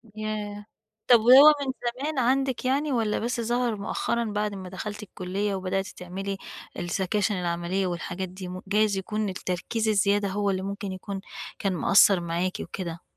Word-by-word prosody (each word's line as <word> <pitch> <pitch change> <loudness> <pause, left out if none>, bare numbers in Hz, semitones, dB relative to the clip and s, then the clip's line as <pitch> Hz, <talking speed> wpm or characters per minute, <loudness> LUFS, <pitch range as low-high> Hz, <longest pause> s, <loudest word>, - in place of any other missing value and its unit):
ياه! 210 -1 -4 0.4
طب، 240 -2 +8
وهو 265 +7 +9
من 270 -2 -1 0.3
زمان 300 -1 -1
عندِك 260 +1 +1
يعني 280 +3 +1
والّا 225 -4 +1
بس 235 +1 -2
ظهر 240 0 0
مؤخرًا 235 +3 -1
بعد 210 -1 -2
ما 185 -1 -7
دخلتِ 210 +3 -6
الكُلية 195 +1 -3
وبدأتِ 190 +1 -2
تعملي 195 +3 -5 0.4
السكاشن 195 +4 0
العملية 175 +1 -1
والحاجات 175 +1 -4
دي 185 0 -8
م 185 +1 -6
جايز 210 0 +2
يكون 210 +2 -2
التركيز 190 +4 -2
الزيادة 205 -1 +2
هو 200 +1 0
اللي 190 -1 0
ممكن 200 0 -4
يكون 190 +1 -6 0.4
كان 195 -2 0
مأثّر 195 +2 +5
معاكِ 170 +2 -2
وكده؟ 170 -3 -6
200 Hz, 155 wpm, -26 LUFS, 185-220 Hz, 0.4 s, وهو